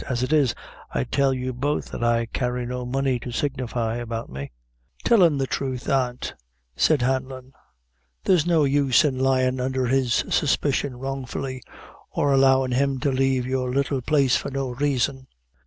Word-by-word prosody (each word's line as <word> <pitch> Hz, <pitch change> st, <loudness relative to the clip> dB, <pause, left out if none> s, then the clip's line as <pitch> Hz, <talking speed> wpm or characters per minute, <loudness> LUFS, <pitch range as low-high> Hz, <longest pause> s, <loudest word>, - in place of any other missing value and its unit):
As 125 Hz, -1 st, -1 dB
it 130 Hz, -, 0 dB
is, 145 Hz, -6 st, +3 dB, 0.3 s
I 60 Hz, -, -1 dB
tell 140 Hz, -, +1 dB
you 130 Hz, 0 st, -3 dB
both 145 Hz, +5 st, -2 dB
that -, -, -4 dB
I 115 Hz, 0 st, +2 dB
carry 125 Hz, +1 st, -2 dB
no 125 Hz, 0 st, -4 dB
money 135 Hz, 0 st, 0 dB
to 125 Hz, -, -7 dB
signify 120 Hz, -4 st, -2 dB
about 115 Hz, -, -5 dB
me." 70 Hz, +2 st, -6 dB, 0.5 s
"Tell 230 Hz, -4 st, +4 dB
him 165 Hz, -5 st, +5 dB
the 135 Hz, -, 0 dB
truth, 130 Hz, +2 st, -3 dB
aunt," 125 Hz, -2 st, -1 dB, 0.4 s
said 150 Hz, -6 st, +3 dB
Hanlon, 130 Hz, 0 st, -2 dB, 0.7 s
"there's 175 Hz, -4 st, +3 dB
no 165 Hz, -3 st, +3 dB
use 140 Hz, -1 st, +3 dB
in 130 Hz, -3 st, 0 dB
lyin' 130 Hz, -1 st, +2 dB
under 130 Hz, 0 st, -1 dB
his 130 Hz, -1 st, +1 dB
suspicion 140 Hz, -2 st, +1 dB
wrongfully, 135 Hz, 0 st, -5 dB, 0.5 s
or 145 Hz, -, +1 dB
allowin' 135 Hz, -1 st, +4 dB
him 135 Hz, +1 st, +1 dB
to 140 Hz, -, +1 dB
lave 130 Hz, -1 st, +1 dB
your 130 Hz, -1 st, -1 dB
little 140 Hz, 0 st, 0 dB
place 135 Hz, -1 st, +3 dB
for -, -, -2 dB
no 135 Hz, -1 st, -3 dB
raison." 130 Hz, 0 st, -1 dB
130 Hz, 165 wpm, -24 LUFS, 125-140 Hz, 0.7 s, him